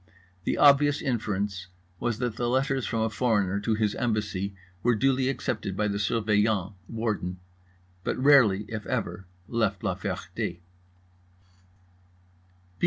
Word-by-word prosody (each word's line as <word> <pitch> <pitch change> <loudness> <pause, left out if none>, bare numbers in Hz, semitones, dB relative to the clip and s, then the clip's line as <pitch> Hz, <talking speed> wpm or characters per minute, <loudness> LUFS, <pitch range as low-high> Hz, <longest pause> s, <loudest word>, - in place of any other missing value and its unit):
The - - 0
obvious 145 0 +5
inference 105 -7 -2 0.3
was 120 -3 -1
that 120 -2 -3
letters 130 +2 +1
from 115 - -1
a 110 - +1
foreigner 105 -4 +1
to 110 +2 0
his 105 -1 +1
embassy 105 -4 -2 0.3
were 120 +2 +3
duly 130 +3 +2
accepted 105 -7 -3
by 105 - +1
the 100 0 -1
Surveillant 105 -1 +1
(Warden), 105 -6 -2 0.7
but - - -1
rarely, 125 -8 +5
if 105 -3 -6
ever, 90 +2 -3 0.2
left 110 -5 0
La - - +1
Ferté. - - -4
B. 85 - -3
110 Hz, 125 wpm, -27 LUFS, 100-120 Hz, 0.7 s, obvious